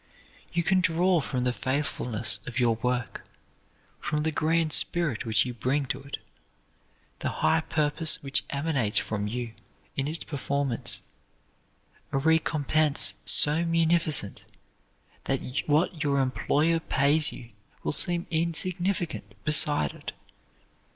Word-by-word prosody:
You 170 -1 0
can 185 +2 +3
draw 175 -1 +2
from 130 -2 -2
the 125 0 +1
faithfulness 125 -6 -1
of 125 +1 -3
your 120 -2 +3
work, 125 0 -2 0.8
from 150 0 -2
the 160 - 0
grand 160 0 +1
spirit 155 -10 +1
which 110 0 +3
you 125 - -4
bring 135 +4 -1
to - - -3
it, 140 +1 -6 1.0
the - - -2 0.2
high 160 +1 +4
purpose 155 0 +2
which 135 0 +1
emanates 140 -7 0
from 105 -1 -1
you 120 +1 -4 0.4
in 135 0 -1
its 160 +2 -5
performance, 140 -3 -1 1.1
a - - 0
recompense 155 -4 +2
so 150 +3 +5
munificent 165 -8 +1 0.8
that 135 -1 0 0.3
what 155 +1 +1
your 140 -1 +1
employer 150 +5 +1
pays 145 0 +2
you 120 -2 -11 0.3
will - - -1
seem 175 +3 +1
insignificant 175 +3 -1
beside 145 - +1
it. - - -8
145 Hz, 125 wpm, -27 LUFS, 130-165 Hz, 1.1 s, so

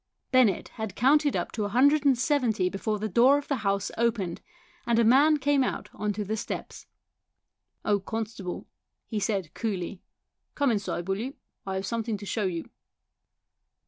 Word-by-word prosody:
Bennett 250 -7 +3
had 220 -3 -6
counted 290 +4 +3
up - - -2
to 215 - -2
a 205 - -2
hundred 285 +6 +4
and 270 -3 +5
seventy 245 - +1
before 210 +3 -2
the 215 +1 -2
door 245 +8 +5
of 290 - -5
the 275 - 0
house 200 -3 -1
opened, 220 -7 0 0.5
and 235 -1 +3
a 235 - +5
man 280 +7 +5
came 285 -1 +2
out - - -3
on 210 0 -2
to 210 - -3
the 215 +3 -2
steps. 220 - -6 0.5
" - - -44
Oh, 205 -1 +3
constable," 210 -2 -5 0.4
he 220 - -3
said 195 -5 -2
coolly, 195 -3 -3 0.3
" - - -54
come 280 -3 +2
inside, 200 -4 -2
will 195 +1 -1
you? 260 +5 -5 0.3
I 190 - -2
have 190 +1 -2
something 225 0 -2
to 205 - -9
show 210 +1 -1
you." 170 -3 -3
220 Hz, 180 wpm, -27 LUFS, 200-255 Hz, 0.5 s, and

